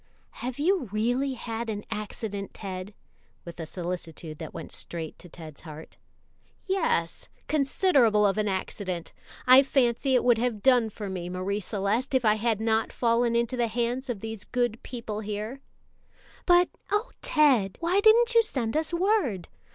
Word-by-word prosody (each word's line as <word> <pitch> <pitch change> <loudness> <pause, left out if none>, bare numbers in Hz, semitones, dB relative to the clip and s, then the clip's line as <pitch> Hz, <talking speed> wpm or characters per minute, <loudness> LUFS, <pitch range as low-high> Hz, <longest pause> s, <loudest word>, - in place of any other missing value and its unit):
"Have 250 0 -4
you 315 - +1
really 245 +6 0
had 230 -1 -4
an 205 -1 -4
accident, 210 -1 -5
Ted?" 190 0 -6 0.5
with 170 0 -9
a 160 - -5
solicitude 170 -3 -6
that 160 -3 -6
went - - -8
straight 165 -2 -6
to 180 - -13
Ted's 155 -3 -11
heart. 155 -1 -11 0.7
"Yes, 330 - -1 0.2
considerable 275 - +3
of 200 +1 +2
an 210 - +1
accident. 185 -2 -3 0.3
I 255 +2 +9
fancy 265 -1 +2
it 250 - +3
would 240 -2 +4
have 230 -4 -1
done 245 -4 +4
for 210 -1 -7
me, 180 -2 -4
Marie 185 +3 -2
Celeste, 210 +6 -1
if 255 -2 +2
I 215 - +6
had 220 0 0
not 220 0 +1
fallen 235 0 +1
into 235 +2 +1
the 240 -1 +1
hands 240 +3 -2
of 220 -5 -3
these 220 -2 -5
good 240 -2 -1
people 230 -4 -6
here." 215 +4 -5 0.9
"But 355 0 +5 0.2
oh, 425 +4 0
Ted," 255 -11 +3
why 345 +4 +2
didn't 460 +3 +5
you 460 - +7
send 255 - -3
us 315 +1 0
word? 340 - 0
225 Hz, 160 wpm, -27 LUFS, 200-260 Hz, 0.9 s, I